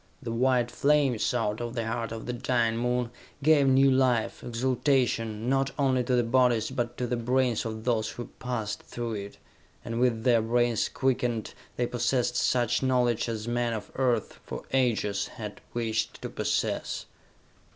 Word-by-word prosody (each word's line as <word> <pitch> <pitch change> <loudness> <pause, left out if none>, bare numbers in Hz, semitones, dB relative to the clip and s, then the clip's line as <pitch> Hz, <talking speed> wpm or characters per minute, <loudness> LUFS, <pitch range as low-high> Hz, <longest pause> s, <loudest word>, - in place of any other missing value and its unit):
The 120 -5 -5
white 120 0 +2
flames, 140 -3 +2
out 110 -2 -1
of 120 0 -4
the 115 -2 -1
heart 115 0 -2
of 115 -1 -6
the 125 - -3
dying 120 -2 +1
Moon, 125 0 0 0.3
gave 145 -2 +5
new 135 +1 +5
life, 130 -3 +1
exaltation, 120 -2 0
not 135 +1 +2
only 130 -3 +2
to 125 - +2
the 120 - +3
bodies 120 -1 +2
but 120 -2 -3
to 125 - -1
the 125 0 -1
brains 125 0 +1
of 110 -1 -5
those 115 -2 +1
who 120 - -6
passed 120 -4 -3
through 120 -1 -5
it, 100 -1 -6 0.5
and 115 0 -3
with 120 -3 +2
their 120 -3 +4
brains 120 0 +1
quickened, 120 -4 -1 0.2
they 120 - 0
possessed 120 0 0
such 120 -1 +2
knowledge 125 -3 +1
as 110 -1 -4
men 120 0 0
of 105 -2 -6
Earth, 125 -5 0
for - - -7
ages, 115 -6 +1
had - - -8
wished 115 -2 -2
to - - -3
possess. - - -1
120 Hz, 165 wpm, -28 LUFS, 115-130 Hz, 0.5 s, gave